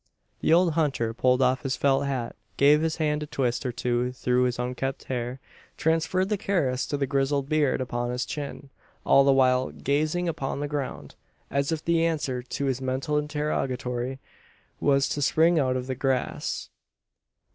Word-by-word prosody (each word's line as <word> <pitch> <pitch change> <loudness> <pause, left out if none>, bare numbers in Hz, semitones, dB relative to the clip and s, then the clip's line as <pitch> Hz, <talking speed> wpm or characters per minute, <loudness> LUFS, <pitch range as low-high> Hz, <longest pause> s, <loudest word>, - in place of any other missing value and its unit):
The - - +1
old 170 0 +5
hunter 140 -8 0
pulled 125 +2 +2
off 130 +2 +2
his 135 -3 -1
felt 140 0 +2
hat; 125 -4 -3 0.2
gave 145 +2 +5
his 160 0 0
hand 150 -2 0
a 150 - -4
twist 130 -2 -1
or - - -1
two 120 +1 -1
through 125 0 +1
his 125 -1 -1
unkempt 125 +2 -3
hair; 125 0 -4 0.4
transferred 165 +4 +1
the 210 -2 0
caress 145 -12 0
to 145 - -2
the 140 - 0
grizzled 135 0 0
beard 150 -3 +2
upon 120 -1 -2
his 125 +1 -2
chin 140 -1 -6 0.3
all 140 - +6
the 140 - +5
while 130 -1 +3
gazing 155 +5 -1
upon 145 -5 -3
the 145 - -2
ground, 145 -2 -4 0.4
as 140 +3 0
if 160 -2 -3
the 165 -1 +2
answer 150 -6 -1
to 130 +3 -4
his 130 -1 -1
mental 130 +3 -1
interrogatory 135 -4 -2 0.6
was 140 -1 +3
to 145 - -2
spring 165 +4 +4
out 130 -2 +1
of 125 - -4
the 130 - -3
grass. 130 0 -2
135 Hz, 175 wpm, -26 LUFS, 125-150 Hz, 0.6 s, all